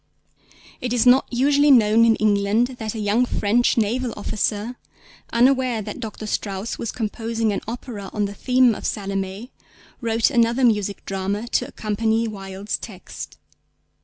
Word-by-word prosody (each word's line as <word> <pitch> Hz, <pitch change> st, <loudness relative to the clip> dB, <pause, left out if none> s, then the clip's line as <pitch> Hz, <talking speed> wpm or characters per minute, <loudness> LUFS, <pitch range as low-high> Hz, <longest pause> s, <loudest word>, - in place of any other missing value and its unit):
It 245 Hz, -1 st, -2 dB
is 245 Hz, -1 st, +2 dB
not 255 Hz, +2 st, +5 dB
usually 285 Hz, +4 st, +3 dB
known 230 Hz, -3 st, +6 dB
in 225 Hz, -1 st, +4 dB
England 210 Hz, +3 st, +2 dB
that 220 Hz, 0 st, -4 dB
a -, -, -4 dB
young 210 Hz, +4 st, +2 dB
French 240 Hz, +1 st, +1 dB
naval 235 Hz, +3 st, 0 dB
officer, 210 Hz, +3 st, -2 dB, 0.6 s
unaware 250 Hz, -2 st, +2 dB
that 210 Hz, +3 st, -7 dB
Dr. 220 Hz, -2 st, -6 dB
Strauss 200 Hz, 0 st, -3 dB
was 230 Hz, -, -3 dB
composing 225 Hz, -1 st, -2 dB
an -, -, -3 dB
opera 225 Hz, -4 st, -6 dB
on 210 Hz, -1 st, -1 dB
the 200 Hz, -, -5 dB
theme 250 Hz, +2 st, +3 dB
of -, -, -8 dB
Salomé, 195 Hz, +3 st, -3 dB, 0.5 s
wrote 230 Hz, +2 st, +1 dB
another 235 Hz, 0 st, +2 dB
music 210 Hz, -4 st, 0 dB
drama 195 Hz, +3 st, -3 dB
to -, -, 0 dB
accompany 220 Hz, +2 st, -1 dB
Wilde's 195 Hz, -1 st, -5 dB
text. 190 Hz, -5 st, -9 dB
225 Hz, 145 wpm, -22 LUFS, 205-240 Hz, 0.6 s, known